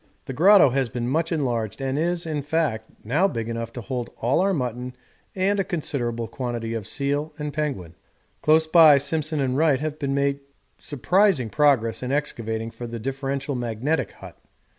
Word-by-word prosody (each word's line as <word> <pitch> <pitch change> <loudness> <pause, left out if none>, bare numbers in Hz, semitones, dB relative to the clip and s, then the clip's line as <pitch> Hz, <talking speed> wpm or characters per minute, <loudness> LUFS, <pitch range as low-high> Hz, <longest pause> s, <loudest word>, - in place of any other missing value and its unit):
The 135 - -5
grotto 185 0 +6
has 130 -1 0
been 120 +1 -3
much 160 +6 0
enlarged 120 - -1
and 135 0 -2
is, 170 +3 -1
in 155 -2 -2
fact, 145 -7 -1 0.2
now 150 - +2
big 115 - -4
enough 115 0 -4
to 120 - -6
hold 120 +3 -4
all 120 +4 +1
our 195 +2 +2
mutton 125 -5 -3 0.4
and 195 +2 +1
a - - +2
considerable 120 - -3
quantity 120 -3 -4
of 110 -4 -4
seal 145 +2 -2
and 150 -1 -4
penguin. 140 - -3 0.5
Close 160 +1 +4
by 160 -3 +7
Simpson 155 +2 -1
and 130 -2 0
Wright 150 -2 +3
have 155 +1 -4
made 140 0 0 0.4
surprising 155 - +1
progress 115 -3 +2
in 125 0 -3
excavating 115 -6 -2
for 120 - -8
the 115 0 -6
differential 135 +3 -3
magnetic 125 +5 -2
hut. - - -13
140 Hz, 170 wpm, -24 LUFS, 120-155 Hz, 0.5 s, by